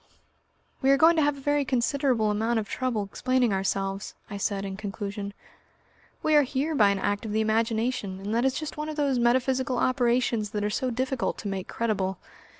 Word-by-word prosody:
"We 265 Hz, -, +3 dB
are 275 Hz, -, +6 dB
going 325 Hz, +4 st, +6 dB
to -, -, +4 dB
have 290 Hz, -1 st, +1 dB
a -, -, -10 dB
very 290 Hz, +1 st, +1 dB
considerable 255 Hz, -3 st, +1 dB
amount 225 Hz, +3 st, 0 dB
of 215 Hz, -2 st, -2 dB
trouble 245 Hz, -4 st, -1 dB
explaining 250 Hz, +3 st, 0 dB
ourselves," 195 Hz, +1 st, -2 dB, 0.2 s
I 200 Hz, -, -4 dB
said 200 Hz, 0 st, -2 dB
in 195 Hz, -1 st, -4 dB
conclusion. 200 Hz, 0 st, -5 dB, 0.9 s
"We 310 Hz, -, +2 dB
are 295 Hz, -, +8 dB
here 285 Hz, +3 st, -1 dB
by 210 Hz, -9 st, +5 dB
an 200 Hz, -, +1 dB
act 205 Hz, +1 st, -1 dB
of 215 Hz, -2 st, -4 dB
the 220 Hz, -, +2 dB
imagination, 220 Hz, -2 st, 0 dB
and 200 Hz, +2 st, -4 dB
that 235 Hz, +1 st, +2 dB
is 265 Hz, 0 st, +2 dB
just 310 Hz, -1 st, -5 dB
one 300 Hz, +1 st, -3 dB
of 310 Hz, -, -4 dB
those 280 Hz, -4 st, +1 dB
metaphysical 255 Hz, +2 st, +2 dB
operations 240 Hz, -4 st, +1 dB
that 205 Hz, -, -1 dB
are 210 Hz, -, 0 dB
so 255 Hz, +4 st, -1 dB
difficult 255 Hz, +1 st, -1 dB
to 210 Hz, -, -6 dB
make 195 Hz, -2 st, -3 dB
credible. 195 Hz, -5 st, -1 dB
235 Hz, 200 wpm, -27 LUFS, 205-265 Hz, 0.9 s, are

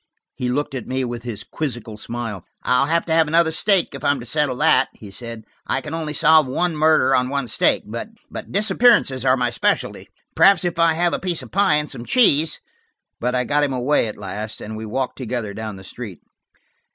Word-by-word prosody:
He 125 Hz, -, -3 dB
looked 145 Hz, +3 st, -2 dB
at 130 Hz, -4 st, -5 dB
me 130 Hz, 0 st, -1 dB
with 120 Hz, -1 st, -5 dB
his 115 Hz, -3 st, -5 dB
quizzical 120 Hz, -7 st, -5 dB
smile. 110 Hz, -3 st, -6 dB, 0.2 s
"I'll 125 Hz, +3 st, +2 dB
have 165 Hz, +2 st, +1 dB
to 160 Hz, -, -1 dB
have 160 Hz, -1 st, +4 dB
another 165 Hz, +1 st, +3 dB
steak, 190 Hz, +2 st, +1 dB
if 135 Hz, 0 st, -9 dB
I'm 145 Hz, -2 st, +2 dB
to 120 Hz, -, -8 dB
settle 145 Hz, 0 st, +1 dB
that," -, -, +3 dB
he 100 Hz, -, -12 dB
said. 115 Hz, +1 st, -6 dB, 0.2 s
"I -, -, 0 dB
can 145 Hz, +3 st, -8 dB
only 160 Hz, -2 st, -3 dB
solve 160 Hz, -1 st, +5 dB
one 170 Hz, +6 st, -1 dB
murder 155 Hz, -2 st, +3 dB
on 125 Hz, -1 st, +2 dB
one 140 Hz, -2 st, -2 dB
steak. -, -, +2 dB
But 210 Hz, -, -8 dB
disappearances 210 Hz, -, +3 dB
are 130 Hz, 0 st, +4 dB
my 125 Hz, -1 st, 0 dB
specialty; 120 Hz, -, -1 dB, 0.3 s
perhaps, 195 Hz, -3 st, +5 dB
if 170 Hz, -1 st, -2 dB
I 165 Hz, -1 st, +4 dB
have 175 Hz, +2 st, 0 dB
a -, -, -1 dB
piece 180 Hz, -3 st, -2 dB
of -, -, -13 dB
pie 195 Hz, -4 st, +3 dB
and 150 Hz, 0 st, 0 dB
some 120 Hz, -, -6 dB
cheese–" 160 Hz, -, +3 dB, 0.6 s
But 125 Hz, +2 st, -1 dB
I 125 Hz, -, +1 dB
got 145 Hz, +4 st, +1 dB
him 140 Hz, -2 st, 0 dB
away 130 Hz, 0 st, +1 dB
at 105 Hz, -, -7 dB
last, 105 Hz, +2 st, -5 dB
and 110 Hz, +1 st, -7 dB
we 110 Hz, 0 st, -6 dB
walked 130 Hz, +5 st, -3 dB
together 120 Hz, -4 st, -4 dB
down 110 Hz, 0 st, -6 dB
the 95 Hz, -, -12 dB
street. 100 Hz, -3 st, -9 dB
135 Hz, 210 wpm, -21 LUFS, 120-160 Hz, 0.6 s, solve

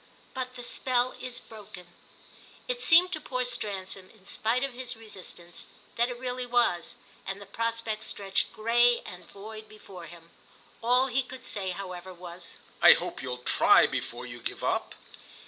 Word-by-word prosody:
But 255 Hz, -1 st, -4 dB
the 245 Hz, -, -7 dB
spell 250 Hz, 0 st, +1 dB
is 250 Hz, -1 st, -3 dB
broken." 210 Hz, -4 st, -11 dB, 0.8 s
It -, -, -2 dB
seemed 355 Hz, +2 st, +7 dB
to 310 Hz, -, -2 dB
poor 255 Hz, -2 st, -1 dB
Stransom, 195 Hz, -5 st, -2 dB
in 205 Hz, -4 st, -22 dB
spite 230 Hz, +6 st, +1 dB
of 275 Hz, -2 st, -2 dB
his 245 Hz, -1 st, -3 dB
resistance, 185 Hz, -5 st, -10 dB, 0.3 s
that 240 Hz, +1 st, +2 dB
it 245 Hz, -, -5 dB
really 250 Hz, 0 st, -3 dB
was, 235 Hz, -8 st, +2 dB, 0.3 s
and 195 Hz, +1 st, -4 dB
the 200 Hz, -, -9 dB
prospect 230 Hz, +1 st, -2 dB
stretched 195 Hz, -1 st, 0 dB
grey 235 Hz, +2 st, +4 dB
and 180 Hz, 0 st, -10 dB
void 215 Hz, +2 st, -9 dB
before 195 Hz, -5 st, -11 dB
him. 170 Hz, 0 st, -14 dB, 0.5 s
All 250 Hz, +3 st, +5 dB
he 265 Hz, 0 st, +2 dB
could 255 Hz, 0 st, -9 dB
say, 195 Hz, -5 st, 0 dB
however, 185 Hz, 0 st, -6 dB
was: 175 Hz, 0 st, -7 dB, 0.3 s
"I -, -, +11 dB
hope -, -, -4 dB
you'll 125 Hz, -1 st, -5 dB
try -, -, +6 dB
before -, -, -3 dB
you -, -, -8 dB
give -, -, -4 dB
up." -, -, 0 dB
220 Hz, 165 wpm, -29 LUFS, 190-250 Hz, 0.8 s, I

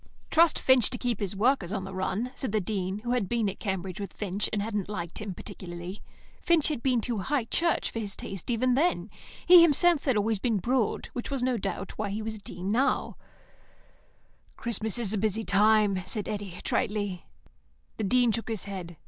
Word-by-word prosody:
"Trust 330 Hz, 0 st, +5 dB
Finch 260 Hz, -4 st, +4 dB
to 245 Hz, -, -4 dB
keep 245 Hz, -4 st, -1 dB
his 200 Hz, -1 st, -2 dB
workers 215 Hz, -3 st, +2 dB
on 200 Hz, -2 st, -2 dB
the 190 Hz, -, -7 dB
run," 190 Hz, +6 st, -2 dB
said 260 Hz, -6 st, -3 dB
the 215 Hz, -, +2 dB
Dean, 190 Hz, -1 st, -2 dB
who 240 Hz, -, -2 dB
had 245 Hz, -7 st, 0 dB
been 235 Hz, -3 st, +1 dB
at 195 Hz, -, -4 dB
Cambridge 190 Hz, -2 st, -3 dB
with 200 Hz, -, -5 dB
Finch, 205 Hz, 0 st, -2 dB
and 210 Hz, -, 0 dB
hadn't 205 Hz, -2 st, -2 dB
liked 175 Hz, -2 st, -5 dB
him 200 Hz, -4 st, -5 dB
particularly. 175 Hz, +2 st, -8 dB, 0.4 s
Finch 335 Hz, -3 st, +3 dB
had 295 Hz, -6 st, -2 dB
been 250 Hz, -3 st, +2 dB
too 235 Hz, -2 st, -2 dB
High 270 Hz, +6 st, 0 dB
Church 335 Hz, +8 st, +1 dB
for 230 Hz, -, -4 dB
his 205 Hz, -3 st, -3 dB
taste 195 Hz, +1 st, -7 dB
even 245 Hz, +2 st, +2 dB
then; 320 Hz, +8 st, +1 dB, 0.3 s
he 355 Hz, -1 st, +10 dB
himself 335 Hz, 0 st, +4 dB
had 260 Hz, -6 st, +2 dB
always 210 Hz, 0 st, +1 dB
been 225 Hz, 0 st, +1 dB
Broad, 235 Hz, +2 st, 0 dB
which 245 Hz, -, -4 dB
was, 275 Hz, -3 st, -1 dB
no 255 Hz, -1 st, +2 dB
doubt, 195 Hz, -2 st, -4 dB
why 210 Hz, -1 st, -1 dB
he 210 Hz, +2 st, -3 dB
was 220 Hz, 0 st, -4 dB
now -, -, -12 dB
a -, -, -21 dB
dean. 200 Hz, +10 st, -1 dB, 1.4 s
"Christmas 220 Hz, -2 st, -2 dB
is 225 Hz, -4 st, -2 dB
a 210 Hz, -, 0 dB
busy 220 Hz, +1 st, 0 dB
time," 205 Hz, -1 st, +4 dB
said 210 Hz, -3 st, -3 dB
Eddy, 200 Hz, -4 st, -5 dB
tritely. 205 Hz, -4 st, -1 dB, 0.7 s
The -, -, -2 dB
Dean 245 Hz, +3 st, +3 dB
shook 230 Hz, +1 st, -3 dB
his 220 Hz, -4 st, -2 dB
head. 180 Hz, -4 st, -7 dB
215 Hz, 200 wpm, -28 LUFS, 195-245 Hz, 1.4 s, he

